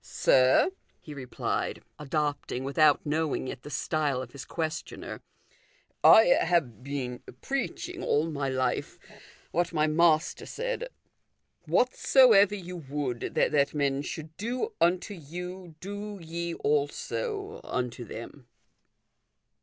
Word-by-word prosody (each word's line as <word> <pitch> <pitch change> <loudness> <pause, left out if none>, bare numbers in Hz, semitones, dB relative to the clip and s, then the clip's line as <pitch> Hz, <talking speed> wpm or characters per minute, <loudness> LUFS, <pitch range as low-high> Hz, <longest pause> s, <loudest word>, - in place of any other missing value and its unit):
" - - -38 0.2
Sir," 130 - +5 0.3
he 155 - -10
replied, 130 -3 -3 0.2
adopting, 145 -3 -2
without 145 +2 +3
knowing 150 -2 -1
it, 125 - -6
the 150 - -9
style 145 -3 0
of 130 -2 -7
his 130 -2 -9
questioner, 160 +3 -5 0.5
" - - -37
I - - +8 0.2
have 130 - 0
been 130 -3 -4 0.2
preaching 345 +6 -3
all 160 - +1
my 140 -2 -2
life 130 -1 -1 0.5
what 175 +1 0
my 155 -1 +3
Master 155 0 +2
said, - - -3 0.4
* - - -45
Whatsoever 240 -5 +5
you 180 -2 -7
would 140 -5 -4
that 140 0 +2
men 140 -1 +1
should 155 +1 -7
do 250 - -2
unto 180 +4 +2
you, 180 +1 -8
do 205 +2 -6
ye 170 0 -4
also 400 - -2
unto 125 -1 -3
them.' 115 +3 -9
155 Hz, 120 wpm, -28 LUFS, 140-185 Hz, 0.5 s, I